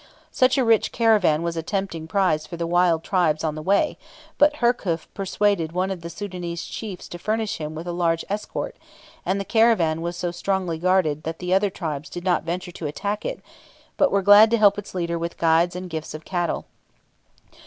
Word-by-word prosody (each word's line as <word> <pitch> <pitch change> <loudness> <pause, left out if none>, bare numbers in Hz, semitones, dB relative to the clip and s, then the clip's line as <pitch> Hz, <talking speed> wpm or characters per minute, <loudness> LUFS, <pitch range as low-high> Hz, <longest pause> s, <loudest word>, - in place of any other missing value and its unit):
So 255 - +4 0.2
rich 225 -2 +4
a - - -12
caravan 210 -9 +3
was 170 0 -2
a 165 - -2
tempting 170 -3 -3
prize 160 -3 +1
for 170 - -7
the 170 - -2
wild 170 -1 +2
tribes 170 -5 +1
on 155 -2 0
the 155 - -6
way; 200 - +1 0.4
but 295 0 +5
Herkhuf 230 - 0
persuaded 195 -4 0
one 185 +2 0
of 185 -3 -5
the 170 - -6
Soudanese 175 -2 -5
chiefs 200 -5 -7
to 175 - -8
furnish 215 +2 -1
him 155 0 -5
with 160 +2 -6
a 175 - -3
large 170 -1 0
escort, 210 +1 -4 0.5
and 195 +1 +1
the 195 - -4
caravan 215 -9 +3
was 170 +1 -4
so 175 -1 -2
strongly 180 -2 -2
guarded 175 -4 +2
that 160 +1 -5
the 180 0 -2
other 195 +1 +3
tribes 155 -4 -5
did 175 - -7
not 180 -2 +2
venture 175 +2 -4
to 165 -2 -5
attack 200 +8 -3
it, - - -4 0.5
but 285 - +3
were 200 -1 +2
glad 205 +3 +8
to 235 - +2
help 205 -2 +4
its 205 - -10
leader 170 -1 -1
with 170 +1 -4
guides 170 +2 +3
and 180 0 -5
gifts 160 -2 -6
of 155 - -9
cattle. 175 -3 -2
180 Hz, 205 wpm, -23 LUFS, 165-200 Hz, 0.5 s, glad